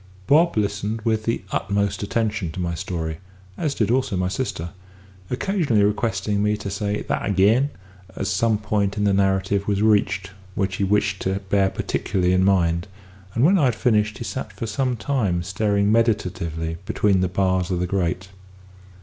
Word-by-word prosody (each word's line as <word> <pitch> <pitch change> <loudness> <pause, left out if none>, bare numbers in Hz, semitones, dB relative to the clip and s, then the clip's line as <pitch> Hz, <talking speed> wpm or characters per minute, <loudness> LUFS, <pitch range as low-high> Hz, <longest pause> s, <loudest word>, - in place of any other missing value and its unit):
Bob 160 - +4
listened 105 +1 -1
with 110 -1 0
the 115 - -1
utmost 100 -1 -1
attention 105 -3 -1
to 85 - -7
my 85 -1 -1
story 80 -2 -4 0.4
(as 150 - -2
did 110 -1 +1
also 125 -6 +1
my 90 0 0
sister), 95 -5 -3 0.6
occasionally 140 - +1
requesting 105 0 0
me 105 0 +1
to 100 -2 -5
"say 105 +1 -2
that - - -2
ag'in," 105 +8 +3 0.5
as - - -3
some 110 +3 +2
point 105 -1 -1
in 105 - 0
the 100 -1 +3
narrative 95 0 +1
was 100 0 +1
reached 100 -2 +2 0.2
which 95 -1 -1
he - - 0
wished 100 0 +1
to 95 +1 -1
bear 100 -1 +3
particularly 90 -1 -1
in 95 0 +3
mind; 85 -2 +2 0.5
and 115 - +2
when 190 +3 +5
I 145 - +4
had 125 -3 +2
finished 110 -2 +1
he - - -5
sat 115 -2 -5
for 95 +4 -5
some 125 +3 -1
time 105 -9 0
staring 100 +2 +1
meditatively 90 -8 0
between 100 -3 +2
the 95 - +2
bars 95 -1 +1
of 90 -2 -1
the 90 - 0
grate. 90 0 -1
100 Hz, 175 wpm, -23 LUFS, 95-110 Hz, 0.6 s, when